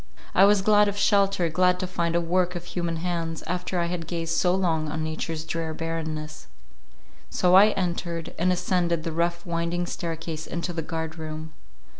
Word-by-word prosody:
I 195 - +7
was 200 -1 +4
glad 210 0 +5
of 205 0 -2
shelter, 200 -3 +3
glad 180 +3 +2
to 185 - -1
find 170 -2 -1
a - - +4
work 180 +1 +1
of 175 0 -5
human 170 -2 -2
hands, 165 -1 -3
after 180 +2 -2
I 170 - +1
had 170 -1 -4
gazed 165 -1 -2
so 180 0 +3
long 165 -5 0
on 160 +1 -3
nature's 155 0 -3
drear 160 -1 -3
barrenness; 155 -1 -4 0.8
so 180 0 +2
I 195 +3 +9
entered, 170 -2 -3
and 180 +2 +3
ascended 175 -2 0
the 165 - -3
rough 170 +1 -1
winding 170 0 -1
staircase 165 -2 -5
into 175 +1 -3
the 165 - -2
guard 160 0 -4
room. 155 0 -6
170 Hz, 180 wpm, -26 LUFS, 165-180 Hz, 0.8 s, I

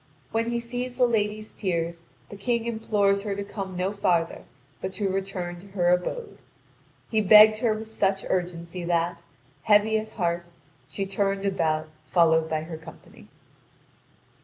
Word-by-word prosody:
When 230 +1 0
he 235 0 0
sees 245 +1 -5
the 250 - +5
lady's 215 -2 -1
tears, 170 -3 -3 0.2
the - - -8
King 230 +3 -1
implores 210 -3 +1
her 200 -1 -3
to 200 - -3
come 195 -2 -6
no 185 +2 -1
farther, 175 -5 0 0.4
but 190 0 -4
to 200 +1 -1
return 190 -2 -3
to 195 - -14
her 175 -1 +3
abode. 420 - -2 0.7
He 220 -1 +3
begged 215 +2 +8
her 220 -1 +1
with 220 0 -6
such 195 -3 0
urgency 175 0 -3
that, 170 0 0 0.4
heavy 215 +4 +4
at 220 0 -8
heart, 175 -3 -1 0.4
she 195 - -3
turned 195 0 -1
about 160 -5 0 0.2
followed 160 -2 +3
by 155 -1 -1
her 160 0 -7
company. 160 0 -14
195 Hz, 155 wpm, -26 LUFS, 175-215 Hz, 0.7 s, begged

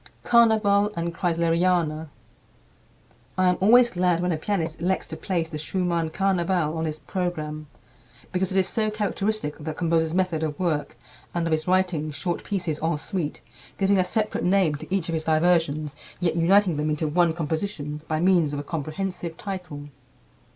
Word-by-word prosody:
"Carnaval" 215 -3 +4
and 170 0 -2
"Kreisleriana." 170 -2 +1 1.3
I 185 -1 +4
am 180 - +1
always 240 +4 +6
glad 180 -1 +1
when 180 +1 0
a 160 - 0
pianist 165 -2 -2
elects 185 +2 0
to - - -7
place 175 -4 -2
the 155 -2 -5
Schumann 170 0 -1
"Carnaval" 175 -3 0
on 160 0 -2
his 155 -1 -3
program, 155 -4 -4 0.6
because 185 +1 -1
it 190 - 0
is 190 -1 +3
so 220 -2 0
characteristic 210 -5 -2
of 150 - -10
the 155 -1 -3
composer's 165 -1 +1
method 180 -4 +1
of 155 -2 -2
work 155 -8 -1 0.4
and 170 -1 0
of 165 - -1
his 155 +1 0
writing 180 -4 +1
short 170 +4 -3
pieces 175 -6 -2
en 165 0 0
suite, 160 -1 -4 0.4
giving 195 0 +3
a - - +4
separate 215 +4 -1
name 180 -3 +3
to 145 - -8
each 190 -4 0
of 165 - -2
his 160 -1 -2
diversions 155 -2 +2 0.2
yet 170 -2 0
uniting 180 0 +4
them 150 +1 0
into 155 +1 -1
one 170 +2 +3
composition 160 -2 -3
by 155 -1 -1
means 170 -4 +3
of 145 - -2
a - - -4
comprehensive 165 +3 -4
title. 180 -8 -6
170 Hz, 170 wpm, -25 LUFS, 155-190 Hz, 1.3 s, always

